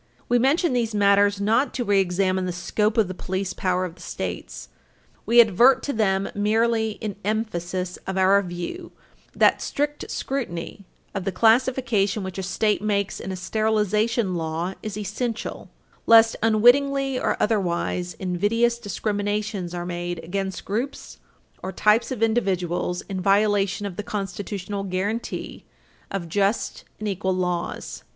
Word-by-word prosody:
We 245 0 +3
mention 285 +5 +2
these 230 -3 0
matters 200 0 +4
not 225 +7 +1
to 250 - -1
reexamine 190 -1 +1
the - - -1
scope 210 +5 -1
of 220 -4 +4
the 185 - -5
police 185 +1 -3
power 185 0 0
of 175 - -6
the 170 - -17
States. 85 - -6 0.6
We 235 +2 +5
advert 235 +4 +6
to 285 - -2
them 195 -3 +1
merely 220 +1 +1
in 210 -3 -4
emphasis 185 -4 -2
of 190 0 -2
our 190 +1 +5
view 180 - -6 0.4
that - - +4
strict 295 +1 -2
scrutiny 200 -8 -4 0.3
of 195 - -3
the 195 - -1
classification 225 -1 +2
which 190 0 -5
a - - -1
State 205 +3 0
makes 200 -2 -1
in 190 - -5
a - - -3
sterilization 215 +1 0
law 165 +2 -2
is 215 -1 -5
essential, 220 +3 -4 0.4
lest 225 0 +7
unwittingly, 260 +5 +4
or - - 0
otherwise, 180 -3 0
invidious 215 +6 +1
discriminations 205 -3 -2
are 175 0 -4
made 175 0 -4
against 190 +2 -4
groups 235 +8 -4 0.4
or 190 - -4
types 215 +4 +3
of 235 -4 -1
individuals 185 -6 0
in 190 -2 -5
violation 200 0 +2
of 185 -3 -6
the - - -1
constitutional 200 0 -4
guaranty 195 +5 -3 0.5
of 195 -3 -4
just 200 +5 -1
and 215 - -3
equal 190 -1 -1
laws. 180 -1 -3
200 Hz, 145 wpm, -24 LUFS, 185-225 Hz, 0.6 s, lest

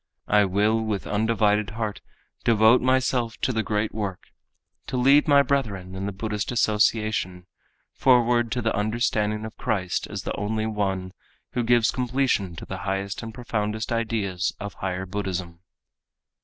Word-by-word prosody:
I 105 -1 +4
will 105 +4 +2
with 105 -3 -2
undivided 105 -1 +1
heart 110 -3 -3 0.4
devote 110 +2 +5
myself 130 -2 +1
to 130 - +1
the 110 - +1
great 105 0 -1
work; 100 -4 -5 0.6
to 130 - -2
lead 140 +5 +5
my 140 -1 +6
brethren 105 -10 -1
in 95 +1 -4
the - - -2
Buddhist 105 +2 -3
Association 105 -5 +1 0.5
forward 120 -2 +3
to 125 - -2
the 115 - +1
understanding 105 0 0
of 110 - -8
Christ 95 -3 -1
as - - -6
the - - -3
only 110 +2 -2
One, 95 -4 -2 0.4
who 125 - -1
gives 120 -1 +3
completion 125 -8 0
to - - -8
the 95 - -5
highest 95 +1 -3
and 115 - -6
profoundest 110 -2 -3
ideas 105 -6 -1
of 100 -1 -6
Higher 95 0 -3
Buddhism. 90 -3 -4
110 Hz, 150 wpm, -25 LUFS, 100-115 Hz, 0.6 s, my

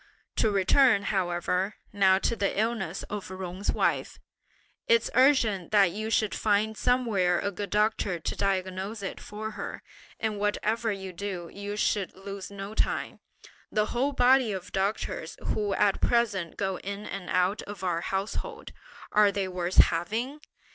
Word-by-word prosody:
To 220 - +3
return 205 +3 +4
however 180 +1 0 0.2
now 190 -2 +5
to 230 - 0
the 200 -2 0
illness 215 -6 -1
of 205 -3 -6
Jung's 185 +1 -3
wife, - - 0 0.7
it's 465 -1 +3
urgent 235 - +3
that 200 -4 +5
you 215 +4 -4
should 215 -2 +1
find 215 +1 +1
somewhere 215 -8 +2
a 200 - -1
good 200 +1 -5
doctor 210 -3 +1
to - - -3
diagnose 195 +2 -2
it 195 - -4
for 215 +1 -6
her; - - -6 0.4
and 215 -2 -2
whatever 215 +2 0
you 190 -2 -5
do, 180 -2 -5
you 205 +1 -5
should 205 -2 0
lose 195 0 -7
no 200 +1 -7
time. - - -1 0.5
The 210 -1 +2
whole 270 +4 +1
body 255 -2 +4
of 185 -2 -6
doctors 205 - -2
who 205 -2 0
at 205 -2 +2
present 205 -8 +1
go 190 -2 -1
in 200 +2 -6
and 195 -2 -6
out 185 +3 +2
of 200 -2 -8
our 175 -2 0
household, 210 - -4 0.4
are 210 -1 +5
they 195 -1 -1
worth 180 0 -3
having? 225 - +3
200 Hz, 155 wpm, -28 LUFS, 190-220 Hz, 0.7 s, now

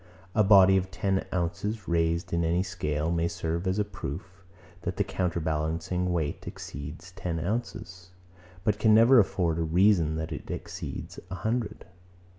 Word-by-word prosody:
A 110 - +4
body 95 -1 +7
of 95 0 -1
ten 95 0 -1
ounces 90 +4 -2
raised 85 0 0
in 85 0 +2
any 85 +3 +2
scale 80 -4 -2
may 85 0 +1
serve 85 +1 -3
as 95 +2 +1
a 105 - +1
proof, 95 0 -7 0.4
that 90 +1 -4
the 100 - +3
counterbalancing 85 0 -1
weight 80 -4 -2
exceeds 75 +6 -8
ten 90 -3 -4
ounces; 95 -1 -4 0.5
but 105 -1 +1
can 110 0 +5
never 115 +3 +7
afford 85 -5 +1
a - - +1
reason 85 -1 +3
that 80 0 -4
it - - -6
exceeds - - -6
a 95 - -4
hundred. 110 +3 -2
90 Hz, 155 wpm, -28 LUFS, 85-100 Hz, 0.5 s, body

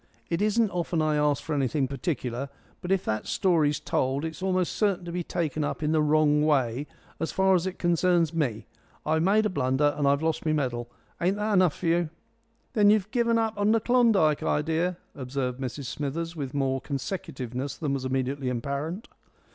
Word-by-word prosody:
It 170 - 0
isn't 215 +1 +2
often 175 -1 -1
I 155 -1 +2
ask 150 -2 +1
for 160 - -3
anything 140 0 +1
particular, 135 -3 -3 0.3
but 180 - -4
if 195 -1 +1
that 110 0 -2
story's 155 -6 +2
told 135 +4 -1
it's 160 +1 -6
almost 185 -2 0
certain 195 -4 0
to 170 - -5
be 180 +1 -2
taken 160 -3 -2
up 145 - -3
in 150 - +1
the 160 -1 +3
wrong 150 0 +3
way 140 -2 +1 0.3
as 165 - -2
far 190 0 +3
as 180 0 +2
it 190 - -5
concerns 175 -1 +2
me. 125 -9 -1 0.4
I've 160 +1 +2
made 205 +5 +3
a - - +2
blunder 140 -1 +1
and 145 -1 +1
I've 140 +2 +2
lost 160 -1 0
my 155 - +1
medal. 120 -5 -2 0.3
Ain't 185 +3 +2
that 210 +1 -1
enough 185 -5 +4
for - - -7
you?" 170 0 +2 0.6
"Then 210 -3 +5
you've 210 -1 +2
given 235 -2 +2
up 225 -1 0
that 220 +1 +2
Klondike 225 -12 +4
idea," 165 +4 0 0.2
observed 130 -1 -3
Mrs 130 +2 -4
Smithers, 165 +5 -4
with 140 -3 -5
more 135 -1 0
consecutiveness 135 - -4
than 150 -4 -2
was 135 -1 -2
immediately 130 +1 -1
apparent. 140 - -3
155 Hz, 185 wpm, -27 LUFS, 140-180 Hz, 0.6 s, Then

